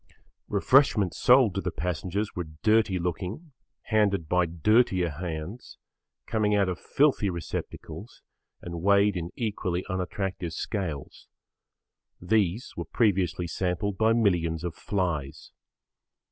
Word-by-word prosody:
Refreshments 125 Hz, -, +3 dB
sold 125 Hz, -5 st, +5 dB
to 100 Hz, -, -2 dB
the 90 Hz, -, -2 dB
passengers 90 Hz, +4 st, -3 dB
were 90 Hz, -2 st, -3 dB, 0.2 s
dirty 110 Hz, -3 st, +3 dB
looking, 90 Hz, -, -4 dB, 0.3 s
handed 100 Hz, -7 st, +1 dB
by 90 Hz, +1 st, +2 dB
dirtier 90 Hz, +1 st, +2 dB
hands, 85 Hz, -, -6 dB, 0.5 s
coming 105 Hz, -2 st, +1 dB
out 100 Hz, -2 st, +3 dB
of 90 Hz, -, -3 dB
filthy 135 Hz, -8 st, +2 dB
receptacles 85 Hz, -2 st, -7 dB, 0.4 s
and 85 Hz, -1 st, -6 dB
weighed 100 Hz, +1 st, +4 dB
in 85 Hz, -1 st, -3 dB
equally 95 Hz, -6 st, -2 dB
unattractive 95 Hz, -2 st, -3 dB
scales. 80 Hz, -, -5 dB, 0.9 s
These 105 Hz, +3 st, 0 dB
were 85 Hz, -, -4 dB
previously 95 Hz, -4 st, +1 dB
sampled 90 Hz, +3 st, -2 dB
by 110 Hz, 0 st, +4 dB
millions 85 Hz, -8 st, +1 dB
of 85 Hz, -2 st, -3 dB
flies. 85 Hz, -8 st, -3 dB
95 Hz, 115 wpm, -27 LUFS, 85-105 Hz, 0.9 s, sold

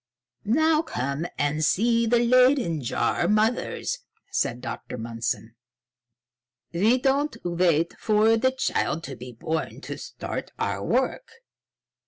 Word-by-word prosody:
"Now 310 Hz, +8 st, +3 dB
come 140 Hz, -, -3 dB
and 150 Hz, +2 st, 0 dB
see 230 Hz, +7 st, +3 dB
the 240 Hz, +2 st, +4 dB
Leyden 250 Hz, -, +4 dB
jar 155 Hz, +7 st, 0 dB
mothers," 220 Hz, -, 0 dB, 0.3 s
said 125 Hz, -, 0 dB
Dr. 125 Hz, 0 st, -6 dB
Mundson. 115 Hz, 0 st, -3 dB, 1.2 s
"We 215 Hz, +9 st, +3 dB
do 265 Hz, +1 st, +2 dB
not 290 Hz, +2 st, -1 dB
wait 170 Hz, -2 st, +2 dB
for 220 Hz, +1 st, +4 dB
the 260 Hz, +3 st, +2 dB
child 255 Hz, -, -1 dB
to 135 Hz, -, -6 dB
be 125 Hz, 0 st, -9 dB
born 160 Hz, +7 st, -3 dB
to -, -, -6 dB
start -, -, -6 dB
our -, -, -2 dB
work." -, -, 0 dB
205 Hz, 125 wpm, -25 LUFS, -, 1.2 s, the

